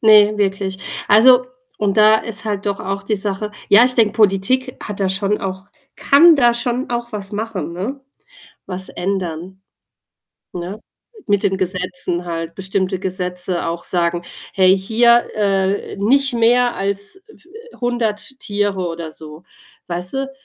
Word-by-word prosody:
Ne, 215 -1 +6
wirklich. 195 -1 -1 0.3
Also 250 +4 +6 0.3
und 200 -1 0
da 215 0 +6
ist 225 -1 -2
halt 205 -2 -3
doch 200 -1 -2
auch 195 +1 -4
die 215 - 0
Sache 205 +1 -3 0.2
ja, 220 +4 +7
ich 250 - +2
denke, 220 -4 +3
Politik 220 +5 +1
hat 210 -2 -7
da 195 - +1
schon 195 +2 -1
auch 190 0 -5 0.3
kann 330 +4 +6
da 240 -3 +4
schon 245 +2 -2
auch 240 -1 -3
was 200 -1 -5
machen, 205 -6 -4
ne? 225 +11 -5 0.7
Was 185 0 -3
ändern, 185 0 -4 0.9
ne? 180 +4 -6 0.5
Mit 205 -2 +1
den 195 -2 0
Gesetzen 180 -1 -1
halt, 165 -1 -5
bestimmte 190 0 -2
Gesetze 180 -1 -2
auch 170 +1 -4
sagen: 175 -1 0 0.3
„Hey, 190 0 +4
hier, 235 +4 +3
äh, 195 -2 0
nicht 265 +7 +2
mehr 240 +1 +3
als 200 - -2
f 430 - -19 0.4
100 240 0 -2
Tiere“ 205 -3 -1
oder 165 -1 -6
so. 155 +1 -11 0.5
Weißt 180 +3 -3
du? 270 0 -2
200 Hz, 145 wpm, -18 LUFS, 185-225 Hz, 0.9 s, ja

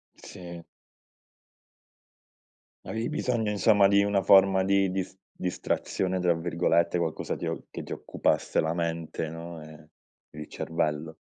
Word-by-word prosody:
Sì. 85 -1 -10 2.2
Avevi 110 +1 -3
bisogno, 125 -8 -1
insomma, 100 -1 +4
di 100 0 +4
una 100 -1 +1
forma 95 -1 +5
di 95 0 +2
dis 95 0 -3 0.2
"distrazione", 90 +1 -2
tra 90 -1 +3
virgolette, 85 +1 +1
qualcosa 85 -3 -2
ti - - -5
o - - -4
che - - -7
ti - - -11
occupasse - - 0
la 80 +1 -1
mente, 85 -1 -3
no, 85 0 -8
e 75 0 -13 0.5
il 75 - -7
cervello. 80 -1 -3
90 Hz, 125 wpm, -27 LUFS, 80-100 Hz, 2.2 s, forma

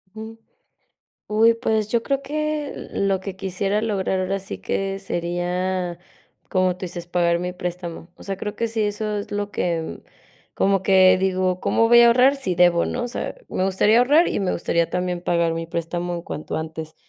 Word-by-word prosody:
Uh. 220 +1 -8 1.0
Ujú, 225 +2 +4
pues 220 -3 0
yo 230 +1 +1
creo 275 +1 -1
que 305 0 -2 0.2
lo 195 -1 +1
que 190 0 -7
quisiera 195 +2 -1
lograr 195 -4 0
ahora 190 +1 -1
sí 195 0 -7
que 195 0 -2
sería, 175 0 -2 0.5
como 185 -1 +2
tú 185 - -4
dices, 175 0 -7
pagar 170 -1 +1
mi 180 +1 -3
préstamo. 175 -1 -6
O - - -14
sea, 195 -1 -4
creo 210 +1 -5
que 230 - 0
sí, 225 0 -3
eso 210 0 -2
es 200 - -6
lo 205 0 -3
que 170 -4 -2 0.5
como 195 -1 +2
que 190 -1 +6
digo, 185 -1 0
¿cómo 230 - +2
voy 235 0 +8
a 235 - +8
ahorrar? 250 +4 +5
Sí 270 -11 -2
debo, 175 -1 +4
¿no? 245 - -3
O - - -4
sea, 245 - -4
me 185 - -1
gustaría 200 +4 +3
ahorrar 290 +7 +5
y - - -1
me 190 -2 0
gustaría 170 0 0
también 180 -1 -2
pagar 170 -1 +1
mi 165 0 -4
préstamo 170 +1 -3
en 170 - -5
cuanto 155 - -5
antes. 160 0 -6
190 Hz, 190 wpm, -22 LUFS, 175-215 Hz, 1.0 s, voy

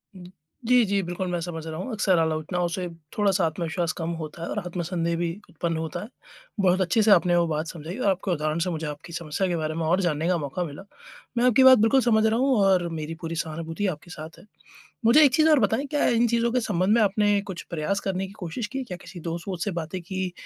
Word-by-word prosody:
उम। 185 - -11 0.4
जी, 250 -1 +5
जी, 200 0 +1
बिल्कुल। 175 +1 -4
मैं 175 -1 -1
समझ 165 -2 -5
रहा 155 - -5
हूँ 255 - -5
अक्सर 205 -5 +2
आलोचनाओं 160 +2 0
से 180 +1 -3 0.3
थोड़ा-सा 195 -3 +2
आत्मविश्वास 165 +1 -2
कम 165 -1 -3
होता 155 +2 -8
है 170 - -4
और - - -2
आत्मसन्देह 170 -1 -2
भी 170 0 -1 0.2
उत्पन्न 165 0 -2
होता 160 -1 -4
है। 210 - -7 0.5
बहुत 185 -1 +3
अच्छे 185 +5 +2
से 210 - +4
आपने 175 -1 +5
वो 170 -1 +3
बात 155 0 -2
समझाई 165 +4 -7
और 230 -6 +1
आपको 190 0 -1
उदाहरण 155 0 -1
से - - -1
मुझे 160 -2 -3
आपकी 150 +3 -8
समस्या 170 +3 -2
के 175 - -1
बारे 155 -1 -2
में 165 0 -2
और 175 +4 +2
जानने 165 -2 0
का 180 -1 +2
मौका 150 +4 -3
मिला। 150 +1 -8 0.5
मैं 240 - +3
आपकी 250 +1 +5
बात 260 0 +9
बिल्कुल 225 +5 +4
समझ 220 -3 +3
रहा 220 +1 +2
हूँ 265 0 +3
और 185 -3 +3
मेरी 155 +2 -5
पूरी 165 -1 -4
सहानुभूति 165 +4 -3
आपके 175 +4 -17
साथ 155 0 -9
है। - - -17 0.6
मुझे 270 +7 +7
एक 275 - +5
चीज़ 315 0 +5
और 305 - +6
बताएँ 225 +6 +1
क्या 295 - +1
इन 240 0 +3
चीज़ों 235 0 +1
के 250 - +2
संबंध 200 -2 +1
में 235 - +4
आपने 205 0 +2
कुछ 175 - -6
प्रयास 170 +5 -1
करने 195 -1 -2
की 190 - -12
कोशिश 185 +5 -4
की? 265 +6 -4
क्या 185 -7 -6
किसी 180 - -10
दोस्त-वोस्त 170 +2 -4
से 205 - -1
बातें 165 +4 -5
की? 185 0 -4
180 Hz, 240 wpm, -25 LUFS, 165-205 Hz, 0.6 s, बात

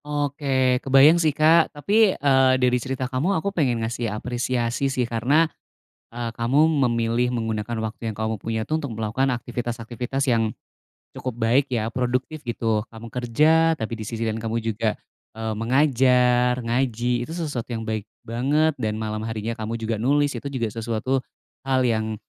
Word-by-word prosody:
Oke 140 -3 0
kebayang 140 +5 +6
sih 160 - +3
Kak, 155 +3 +4
tapi, 205 +7 +3
eee, 135 -2 +4
dari 125 -1 +2
cerita 130 +1 -3
kamu 135 +10 0
aku 200 +5 -2
pengen 125 - 0
ngasih 115 0 -2
apresiasi 120 +3 -1
sih 130 -2 0
karena, 125 +8 +2 0.7
eee, 120 -1 -5
kamu 130 +7 +3 0.2
memilih 120 0 +1
menggunakan 110 -1 -2
waktu 110 +1 -4
yang 105 - -8
kamu 110 0 -1
punya 110 +2 -3
tuh 155 +1 -1
untuk 120 -6 -5
melakukan 115 +5 0
aktivitas-aktivitas 120 +2 -3
yang 115 -3 +2 0.6
cukup 130 -3 -5
baik 120 +4 +2
ya 115 -3 -2
produktif 130 +4 -2
gitu. 115 -2 0
Kamu 115 0 -11
kerja 155 +7 +3
tapi 115 -4 -5
di 110 - -6
sisi 115 0 -4
lain 110 0 -1
kamu 115 0 -2
juga, 110 -1 -1 0.4
eee, 110 0 -3
mengajar, 125 0 +3
ngaji 120 0 0
itu - - -8
sesuatu 150 -9 -3
yang 115 -2 -4
baik 110 -2 -3 0.2
banget 140 +7 +1
dan 110 -1 -1
malam 110 0 -4
harinya 110 0 -3
kamu 110 0 -4
juga 115 -1 -3
nulis 145 +4 +2
itu 140 - -5
juga 125 -6 -2
sesuatu 115 +4 -1 0.5
hal 130 -1 +2
yang, 110 -2 0
120 Hz, 160 wpm, -23 LUFS, 115-135 Hz, 0.7 s, kebayang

